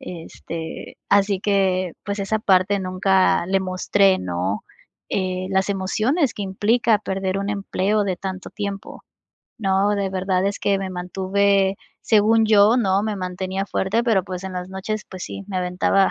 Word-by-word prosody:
Este, 165 -1 -8
así 200 -1 +3
que, 190 -4 +1
pues 200 0 -3
esa 200 +2 0
parte 195 0 +3
nunca 185 -1 +2
le 195 0 +1
mostré, 190 +1 +2
¿no? 90 +3 -3 0.5
Eh, 185 -1 -1
las 190 +1 +1
emociones 220 - 0
que 205 - -4
implica 210 +3 +2
perder 190 -1 -2
un 200 +1 -2
empleo 205 +1 0
de 190 -3 -1
tanto 185 0 -6
tiempo, 200 -1 -6 0.5
¿no? 195 0 +2
De 200 -1 -1
verdad 185 0 0
es 200 - -2
que 200 - +1
me 195 - -3
mantuve, 195 +2 +1 0.2
según 220 +1 +4
yo, 215 +2 +5
¿no?, 195 -2 +2
me 215 -1 -1
mantenía 185 +1 -3
fuerte, 210 +5 0
pero 210 -6 +2
pues 185 -1 -6
en 190 -1 -6
las 180 +1 -5
noches, 200 +3 -4
pues 185 -1 -8
sí, 200 - -6
me 190 -2 -3
aventaba, 180 +2 +2
195 Hz, 160 wpm, -22 LUFS, 185-205 Hz, 0.5 s, yo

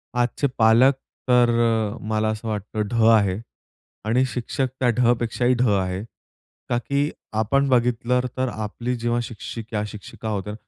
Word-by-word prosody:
आजचे 125 +3 +1
पालक 115 +5 +6 0.4
तर 125 -1 +5 0.6
मला 110 0 +1
असं 110 +1 -4
वाटतं 105 0 -3
ढ 115 -1 +1
आहे 100 -3 +2 0.7
आणि 120 +4 +2
शिक्षक 130 +2 -1
त्या 125 - +3
ढ 120 -1 +5
पेक्षाही 120 +2 +1
ढ 125 - +3
आहे. 95 -1 0 0.7
का? 120 - +1
की 140 +5 0 0.3
आपण 140 +6 +2
बघितलं 125 0 +2 0.2
तर 130 0 +1
आपली 110 +3 -3
जेव्हा 120 +1 0
शिक्षिका, 110 -1 -5
शिक्षिका 105 +1 -8
होत्या 105 -1 -3
115 Hz, 140 wpm, -23 LUFS, 110-125 Hz, 0.7 s, पालक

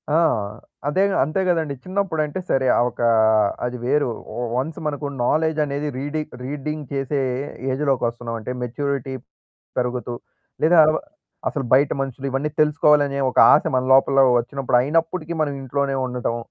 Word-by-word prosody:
ఆ! - - +5 0.7
అదేగా 190 +6 +2
అంతే 155 +7 -2
కదండీ. 160 -5 0
చిన్నప్పుడంటే 185 -4 -1
సరే 130 -1 +2
ఆ! - - +2
ఒక 120 - -20 0.7
అది 125 0 -3
వేరు. 145 -1 +2 0.5
వన్స్ 150 +5 -3
మనకు 145 0 -3 0.2
నాలెడ్జ్ 155 +3 +1
అనేది 145 +1 -3
రీడింగ్ 150 +2 -4
రీడింగ్ 150 +2 -4
చేసే 135 +1 -1 0.5
ఏజ్‌లోకొస్తున్నామంటే 120 -4 -2
మెచ్యూరిటీ 135 +2 -3 0.7
పెరుగుతూ, 125 -1 -2 0.5
లేదా 165 +2 +5
అల 155 - +4 0.6
అసలు 140 -4 -3
బయట 140 +2 +5
మనుషులు 135 0 -4
ఇవన్నీ 140 +3 -1
తెలుసుకోవాలనే 150 -2 +3
ఒక - - -3
ఆశ 150 - +5
మన 130 0 +1
లోపల 135 +1 +5 0.2
వచ్చినప్పుడు 130 +1 -1
అయినప్పటికీ 165 +4 -1
మనం 145 -2 0
ఇంట్లోనే 140 +1 -1
ఉండటం. 125 -2 -2
140 Hz, 130 wpm, -22 LUFS, 130-155 Hz, 0.7 s, ఆ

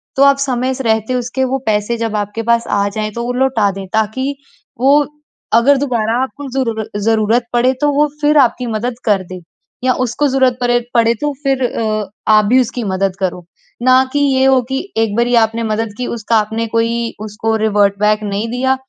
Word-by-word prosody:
तो 275 - +4
आप 280 0 +5
समय 260 -1 -1
से 265 - -5
रहते 220 +1 0
उसके 250 +2 -2
वो 265 +1 -1
पैसे 215 +2 0
जब 225 -2 -2
आपके 205 +2 -3
पास 235 0 +2
आ 200 0 +1
जाएँ, 215 +1 -3
तो 235 +3 -5
वो 245 - -2
लौटा 250 -5 +1
दें, 195 0 -7
ताकि 260 +6 -1 0.4
वो 280 +3 +4 0.5
अगर 265 +5 +5
दोबारा 240 -3 0
आपको 285 +2 -7
ज़रूर 230 -5 -2
ज़रूरत 225 +2 +2
पड़े 250 +2 +3
तो 295 0 +3
वो 295 +1 +3
फिर 295 +1 +3
आपकी 250 -2 +3
मदद 230 +2 -2
कर 200 -3 +2
दे 185 - -7 0.5
या 255 - +3
उसको 280 +5 0
ज़रूरत 260 -2 +2
परे 240 0 +2
पड़े, 230 -1 +3
तो 295 +5 -2
फिर 270 -1 +1
अ 215 -3 -2 0.2
आप 215 -1 +5
भी 255 +5 +4
उसकी 245 0 -3
मदद 190 -1 -1
करो, 180 -2 -3 0.4
ना 255 +1 +5
कि 290 - +1
ये 270 -2 +2
हो 265 -1 +4
कि 265 0 -1 0.2
एक 225 -2 +1
बारी 240 +1 +2
आपने 225 +1 -2
मदद 215 -1 -2
की 250 - -3
उसका 230 0 -2
आपने 220 +2 -1
कोई 230 +1 -1
उसको 220 +1 -2
रिवर्ट 205 -2 +1
बैक 210 0 +2
नहीं 205 +2 -2
दिया, 260 +2 +1
235 Hz, 200 wpm, -16 LUFS, 215-260 Hz, 0.5 s, आप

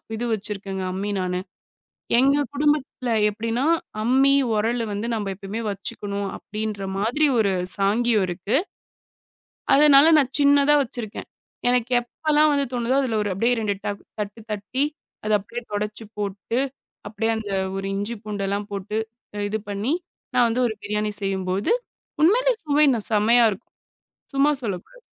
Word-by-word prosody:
இது 235 +2 -3
வச்சிருக்கேங்க 195 -2 -4
அம்மி 200 +2 -2
நானு. 180 -1 -1 0.8
எங்க 275 +3 +4 0.2
குடும்பத்துல 285 -4 0 0.2
எப்டின்னா 230 +4 -2 0.4
அம்மி, 265 +4 +4 0.2
உரலு 230 +2 0
வந்து 205 +3 -3
நம்ப 215 -2 -2
எப்பவுமே 200 +3 -6
வச்சுக்கணும் 200 0 -4
அப்டின்ற 210 -2 -5
மாதிரி 245 +9 +2
ஒரு 200 -3 +3 0.2
சாங்கியம் 210 +1 +2
இருக்கு. 185 +6 -1 1.2
அதனால 290 0 +7
நான் 270 -2 +1
சின்னதா 285 0 +5
வச்சிருக்கேன். 235 -4 -6 0.4
எனக்கு 245 0 +1
எப்பல்லாம் 305 +5 +2
வந்து 280 -1 +1
தோணுதோ 245 +2 0
அதுல 230 -5 0
ஒரு 205 - -2
அப்டியே 235 +5 +2
2 205 -2 0
தட் 200 0 -3 0.2
தட்டு 210 +2 -5
தட்டி 210 +7 -1 0.4
அத 215 - -2
அப்டியே 235 +5 -7
துடைச்சு 210 +2 -3
போட்டு, 205 +3 -2 0.5
அப்டியே 225 +1 -1
அந்த 215 -2 -5 0.3
ஒரு 195 - -4
இஞ்சி, 205 +4 -2
பூண்டு 205 -2 -3
எல்லாம் 200 +1 -2
போட்டு, 200 +2 -3 0.5
இது 220 +1 -1
பண்ணி 205 +7 -1 0.4
நான் 245 -1 +5
வந்து 245 +3 0
ஒரு 220 - -2
பிரியாணி 210 0 -1
செய்யும்போது, 190 0 -1 0.5
உண்மையிலே - - +5
சுவைனா 290 -5 +4
செமையா 230 +3 +5
இருக்கும். 205 +3 -10 0.6
சும்மா 280 +2 +4
சொல்லக் 190 -5 -3
கூடாது. - - -19
220 Hz, 140 wpm, -23 LUFS, 205-255 Hz, 1.2 s, அதனால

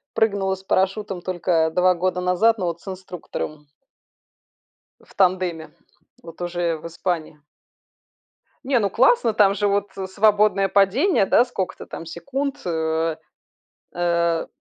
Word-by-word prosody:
прыгнула 200 -3 +1
с 190 - -16
парашютом 190 0 -1
только 175 -3 0
2 180 0 +4
года 180 +1 -1
назад, 180 +6 +3
но 185 - -2
вот 170 -1 -3
с - - -21
инструктором. 180 -5 -7 1.3
В - - -22
тандеме, 180 -4 0 0.5
вот 165 +1 -12
уже 175 -1 -1
в 155 - -13
Испании. 165 -3 -4 1.3
Не, 260 -2 +2
ну 200 -3 0
классно, 240 - +3
там 205 -2 +4
же 205 +1 +1
вот, 200 0 0
э, 190 - -3
свободное 205 0 +3
падение, 200 - +3
да, 235 - +4
сколько-то 200 -7 -5
там 165 - -8
секунд. 275 - -4
Э 160 -1 -1 0.8
э. 170 -1 0
185 Hz, 130 wpm, -22 LUFS, 170-205 Hz, 1.3 s, 2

